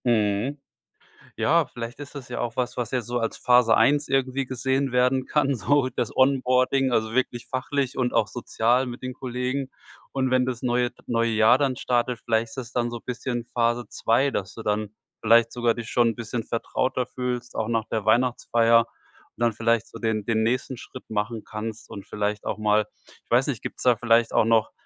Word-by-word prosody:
Mhm. 110 +3 +1 0.8
Ja, 165 0 +3
vielleicht 120 0 -7
ist 145 0 -9
das 140 -4 -8
ja 125 - -4
auch 120 -1 -3
was, 125 -1 -2
was 120 -3 -2
jetzt 125 -4 -2
so 120 0 -1
als 115 -1 -2
Phase 125 -3 +4
1 145 +1 +3
irgendwie 135 0 0
gesehen 130 +2 -1
werden 125 +1 +2
kann, 140 -2 +1
so 130 +5 +2
das - - -4
Onboarding, 130 0 +3
also 110 -1 +1
wirklich 125 -2 -1
fachlich 130 0 -2
und 125 -2 0
auch - - +2
sozial 120 +1 0
mit 120 0 -7
den 130 0 -5
Kollegen. 130 +2 -3 0.4
Und 130 -1 0
wenn 130 0 +3
das 125 -2 -4
neue 125 -1 +1 0.2
neue 115 -1 +1
Jahr 110 +3 +5
dann 135 -2 0
startet, 120 -1 0
vielleicht 115 +1 0
ist 125 -2 -6
dann 120 -1 0
so 120 - -5
'n - - -24
bisschen 120 -1 -3
Phase 120 0 0
2: 125 +5 +1
Dass 95 -7 -4
du 115 - -8
dann 105 -1 -1 0.3
vielleicht 115 +1 +4
sogar 120 -2 +1
dich 115 -2 -7
schon 120 -1 +3
'n - - -5
bisschen 115 0 -4
vertrauter 125 +2 -1
fühlst, 125 -1 -4
auch 110 -1 -1
nach 115 -2 0
der 110 -2 -3
Weihnachtsfeier, 115 0 +3 0.5
und - - -19
dann 120 -1 +3
vielleicht 115 +1 +1
so - - -10
den 110 -2 -1
den 110 0 +1
nächsten 125 +2 -1
Schritt 130 +2 -11
machen 110 +1 -2
kannst, 110 +1 -6
und 100 - -8
vielleicht 105 0 -2
auch 105 - -2
mal 105 0 +2 0.4
ich - - -42
weiß - - +4
nicht, - - -3
gibt's - - -6
da 125 -2 +4
vielleicht 115 0 +3
auch - - +4
noch 115 -1 +3
120 Hz, 200 wpm, -25 LUFS, 115-130 Hz, 0.8 s, Jahr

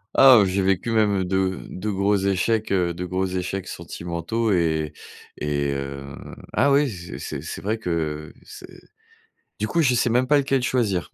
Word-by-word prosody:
Ah, 130 -3 +9
heu, - - +4
j'ai 95 +1 0
vécu 95 +4 +1
même 105 -4 +2
de 95 0 0
de 105 +4 -4
gros 100 +1 +2
échecs, 100 +3 0
heu, 90 -3 +1
de 90 +2 -5
gros 95 +1 -1
échecs 95 +1 -3
sentimentaux 85 +6 -3
et 80 -3 0 0.4
et 70 -1 -1
heu, 70 0 -6 0.4
ah 140 +5 +3
oui, 140 0 +4
c'est 90 -5 -8
c'est - - -5
c'est - - -6
vrai 110 +3 -1
que 80 -6 -3
c'est - - -11 0.9
du 110 - 0
coup, 170 - +2
je 125 -4 +3
sais 120 0 +2
même 125 +2 +2
pas 145 +2 +4
lequel 135 -2 +1
choisir. 110 -8 0
95 Hz, 180 wpm, -23 LUFS, 85-115 Hz, 0.9 s, Ah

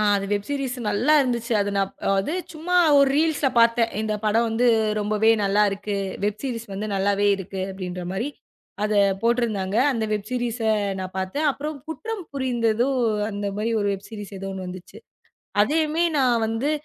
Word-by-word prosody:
அ. - - +2
அது 195 - -3
வெப்சீரீஸ் 265 +5 -3
நல்லா 235 +9 +3
இருந்துச்சு. 240 -2 -2
அது 200 0 0
நாப் 195 0 -1
அதாவது 195 +9 +1 0.2
சும்மா 335 +3 -1 0.2
ஒரு 280 -1 +5
ரீல்ஸ் 315 -1 +1
ல - - +5
பாத்தேன். 230 0 +3
இந்தப் 215 -1 -2
படம் 225 +2 +2
வந்து 230 +3 +1 0.3
ரொம்பவே 215 +2 +2
நல்லா 200 +2 +3
இருக்கு 200 +1 -3 0.3
வெப்சீரீஸ் 230 +2 -3
வந்து 210 +2 -4
நல்லாவே 200 +1 +1
இருக்கு 190 0 -6
அப்படின்ற 180 -1 -6
மாரி 230 +9 -2 0.5
அத 215 0 0 0.3
போட்ருந்தாங்க. 220 -5 0 0.2
அந்த 225 -3 -1
வெப்சீரீஸ்ஸ 235 +2 -3 0.3
நான் 185 0 -6
பாத்தேன். 190 +12 -1
அப்புறம் 300 +2 -5
குற்றம் 385 +5 -5
புரிந்ததோ 240 -3 +1 0.4
அந்த 205 0 -4
மாரி 225 +2 -1
ஒரு 205 - 0
வெப்சீரீஸ் 205 0 -9
எதோ 195 +1 -5
ஒன்னு 190 -1 -6
வந்துச்சு. 180 0 -9 0.6
அதையுமே 310 +6 +1
நான் 245 -4 +3
வந்து 225 +6 -1
225 Hz, 155 wpm, -24 LUFS, 200-255 Hz, 0.6 s, ஒரு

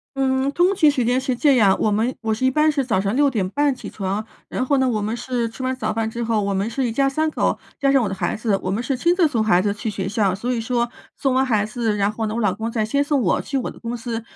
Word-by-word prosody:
嗯， 265 0 +1
通 360 +5 +2
勤 305 -5 +5
时 255 -4 0
间 250 +2 +2
是 260 -1 -1
这 285 -2 +4
样， 200 -5 +4
我 215 - +2
们 225 +5 +1
我 220 -1 -1
是 260 +4 -1
一 260 - +4
般 305 +2 +3
是 285 -3 +1
早 220 -7 0
上 200 +4 -1
6 285 0 +4
点 205 -7 -1
半 285 +3 +1
起 - - -9
床， 200 +2 -3 0.2
然 255 - -2
后 280 +1 +2
呢， 260 -1 +2
我 215 -3 -1
们 215 +3 -2
是 240 -2 -2
吃 245 +3 -8
完 260 0 0
早 220 -4 -2
饭 225 0 -1
之 235 - -5
后， 225 -2 0
我 200 0 -1
们 195 +4 -1
是 260 +3 -2
一 230 - -1
家 275 +4 +2
3 310 +3 0
口 - - 0 0.2
加 275 - +2
上 265 -3 +4
我 - - -1
的 - - -3
孩 - - -1
子， 215 -3 0
我 185 - -3
们 215 +5 -1
是 270 -1 -1
亲 345 +5 +2
自 355 -3 +4
送 245 -7 +1
孩 185 -4 +3
子 205 0 0
去 215 +2 -4
学 195 -2 -3
校。 195 -3 +1
所 245 +5 -2
以 235 - -1
说 235 +1 -1 0.3
送 270 -2 0
完 265 +1 +3
孩 215 -4 +1
子， 220 -1 -1
然 200 +1 +1
后 220 +1 -3
呢， 215 +1 -3
我 235 - -1
老 200 -3 +2
公 220 +3 -4
再 225 -2 -1
先 280 +7 0
送 285 -2 +1
我， 185 - +2
去 275 - -3
我 255 - -3
的 - - -15
公 235 +1 -4
司。 230 -1 -4
235 Hz, 325 characters per minute, -21 LUFS, 215-265 Hz, 0.3 s, 勤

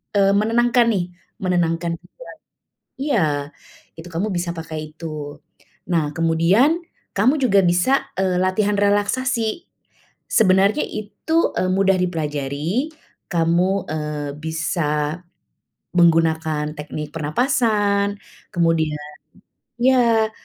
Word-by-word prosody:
eee, 195 -1 +4
menenangkan 240 +2 +3
nih, 180 -3 0 0.4
menenangkan 170 -2 0
pikiran - - -15 0.7
iya, 235 - +2 0.7
itu 165 - -9
kamu 185 +6 -1
bisa 175 0 -2
pakai 160 -1 -5 0.2
itu. 165 - -11 0.9
Nah, 155 -3 +1
kemudian 170 - +3 0.4
kamu 230 +8 +4
juga 200 -6 +4
bisa, 180 +10 +2
eee, 185 -2 +1
latihan 200 +3 +1
relaksasi. 220 - 0 0.6
Sebenarnya 200 +5 +3
itu, 220 +10 -1
eee, 185 - +1
mudah 195 0 +3
dipelajari, 155 - -2 0.4
kamu, 170 0 +2 0.3
eee, 150 -1 -3
bisa 160 0 -1 0.8
menggunakan 160 -2 +3
teknik 150 0 -6
pernafasan. 205 - +1 0.4
Kemudian 165 -3 +1 0.8
ya, 235 -4 +4
185 Hz, 95 wpm, -21 LUFS, 160-215 Hz, 0.9 s, eee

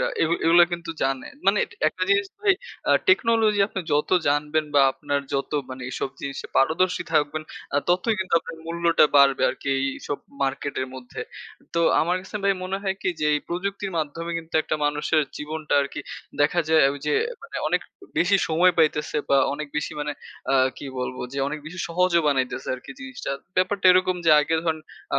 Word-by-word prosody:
রা - - +1 0.2
এগু 165 +1 +2
এগুলো 170 +1 +7
কিন্তু 170 -1 -4
জানে। 135 -1 -1 0.2
মানে 200 +1 +4 0.3
একটা 185 - -7
জিনিস 200 0 +3
ভাই 415 -2 +4 0.4
আ - - +4 0.2
টেকনোলজি 225 - +4
আপনি 190 - -4
যত 150 +1 +1 0.2
জানবেন 150 +2 +1
বা 140 - +6
আপনার 145 -1 -2
যত 135 - -1 0.2
মানে 130 0 -7
এসব 135 - -3
জিনিস 140 -1 -5 0.2
পারদর্শী 180 +6 +2
থাকবেন 155 0 +1 0.3
আ - - +5
ততই 185 +6 +2
কিন্তু 185 -2 -1
আপনার 165 0 -9
মূল্যটা 170 -1 +3
বাড়বে 140 -1 +5
আরকি 140 - -7
এইসব 135 +1 -3 0.2
মার্কেটের 135 -1 -2
মধ্যে। 130 -1 -8 0.5
তো 170 - +2 0.2
আমার 175 +3 +1
কাছে 210 - -7
ভাই 200 - +4
মনে 185 +1 -2
হয় 190 -1 -1
কি - - 0
যে, 150 - +1
এই 145 - 0
প্রযুক্তির 195 +2 -3
মাধ্যমে 165 +3 -3
কিন্তু 165 0 -12
একটা - - -2
মানুষের 150 +1 +1
জীবনটা 155 0 -3
আরকি 140 - -4 0.4
দেখা 165 +4 +3
যায় 160 -1 +5
ঐযে 145 +1 -2 0.3
মানে 460 - -8
অনেক - - +1 0.4
বেশি 190 +3 +4
সময় 175 +3 +4
পাইতেছে 150 -2 +2
বা 140 - +4 0.2
অনেক 150 0 -5
বেশি 150 - -2
মানে 150 0 -2 0.4
আ - - +4 0.2
কি 140 - -7
বলবো 125 0 -4
যে 140 - -4
অনেক 155 - -4
বেশি 180 +3 -8
সহজ 180 +1 +1
বানাইতেছে 130 -2 0
আরকি 125 - -11
জিনিসটা। 270 - -6 0.3
ব্যাপারটা 185 +1 +2
এরকম 185 0 +2
যে 160 - +7
আগে 160 +2 0
ধরেন 160 -1 0 0.4
আ - - +3
160 Hz, 180 wpm, -24 LUFS, 145-185 Hz, 0.5 s, এগুলো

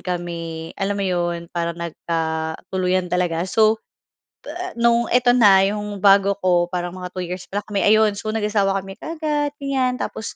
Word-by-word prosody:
kami 170 -2 -5
alam 195 +1 -1
mo 200 - -2
'yon, 175 -2 -2
parang 170 -1 -2
nagkatuluyan 170 +2 -2
talaga. 175 -2 0
So, 220 0 +3 0.6
ta 355 +4 -6
no'ng 235 0 +3
eto 250 0 +4
na, 205 -6 +6
'yong 205 0 -3
bago 200 0 +5
ko, 175 -1 +3
parang 175 0 -3
mga 180 0 -8
2 185 - -3
years 180 +1 -6
pala 205 +1 -3
kami, 205 -2 -3
ayun. 215 0 +5
So, 215 - -7
nag-asawa 210 -2 +1
kami 195 0 -10
kaagad, 300 -3 -2
ganyan 270 -3 -1
tapos, 225 - -5
195 Hz, 160 wpm, -21 LUFS, 175-220 Hz, 0.6 s, na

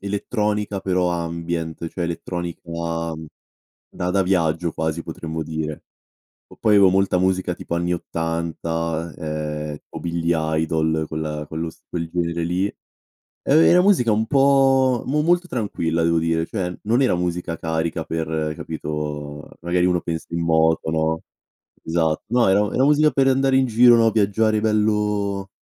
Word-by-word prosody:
elettronica 105 0 -2
però 90 -2 +1
ambient 85 -1 -3
cioè 90 - -5
elettronica 85 0 -4 1.3
da 90 0 -3
da 100 0 +2
viaggio 85 -3 0
quasi 80 +1 -2
potremmo 80 0 -6
dire. 80 -1 -4 0.7
O - - -13
poi 105 -1 +4
avevo 95 -2 +6
molta 95 -1 +2
musica 95 -1 0
tipo 85 - -5
anni 85 +1 0
80 80 -1 -3
eh, 75 -1 -4
o - - -8
Billy 85 0 -2 0.3
Idol, 80 0 0
quella 75 -1 -4
quello 80 +1 -4
s - - -22
quel 85 -2 -4
genere 85 -1 -2
lì. 90 +3 0 0.6
Eh, 155 +4 +3
è - - +5
una 180 +1 +6
musica 180 - +3
un 110 +1 +1
po' 135 -2 +4
mo 150 +3 +1
molto 175 +2 +2
tranquilla 85 - -1
devo 85 0 +2
dire, 80 0 0
cioè 90 -3 -3
non 120 +5 +2
era 125 -9 +3
musica 90 -1 -2
carica 80 0 -2
per, 80 -1 -2
capito, 75 -2 -5
magari 90 +1 +1
uno 90 -1 +1
pensa 80 -1 -4
in 85 - -1
moto, 80 -1 +2
no, 80 0 0 0.6
esatto. 80 -1 0
No, 120 +1 +3
era 95 +2 +4
era 130 - +2
musica 150 +2 +5
per 135 -1 +2
andare 135 0 +3
in 130 - +3
giro, 120 +1 +6
no? 115 -1 +4
Viaggiare 110 +1 +2
bello 105 -2 0
85 Hz, 150 wpm, -22 LUFS, 80-105 Hz, 1.3 s, avevo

